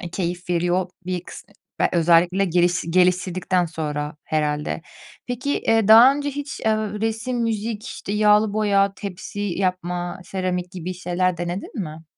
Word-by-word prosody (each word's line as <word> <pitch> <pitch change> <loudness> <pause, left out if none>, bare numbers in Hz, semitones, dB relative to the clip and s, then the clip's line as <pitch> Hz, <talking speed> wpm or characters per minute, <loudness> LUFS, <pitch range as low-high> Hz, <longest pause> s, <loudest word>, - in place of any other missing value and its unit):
e, 175 - -6
keyif 180 0 -3
veriyor 175 +1 +1 0.2
bir 180 -2 -2
kıs - - -10 0.4
be - - +4
özellikle 175 +3 +4
geliş 175 0 +2
geliştirdikten 180 0 +2
sonra 150 -2 -4
herhâlde. 150 0 -1 0.4
Peki, 255 +3 -2
eee, 225 -2 +2
daha 235 +5 +9
önce 290 0 -2
hiç, 285 0 -6
eee, - - -6
resim, 220 +3 -2
müzik, 220 0 -2
işte, 205 -5 -6
yağlı 210 0 +4
boya, 200 -2 +2
tepsi 200 +1 -7
yapma, 180 -2 -2
seramik 180 -2 -3
gibi 185 0 -5
şeyler 180 0 -1
denedin 175 +5 -4
mi? 155 0 -9
185 Hz, 145 wpm, -22 LUFS, 175-210 Hz, 0.4 s, daha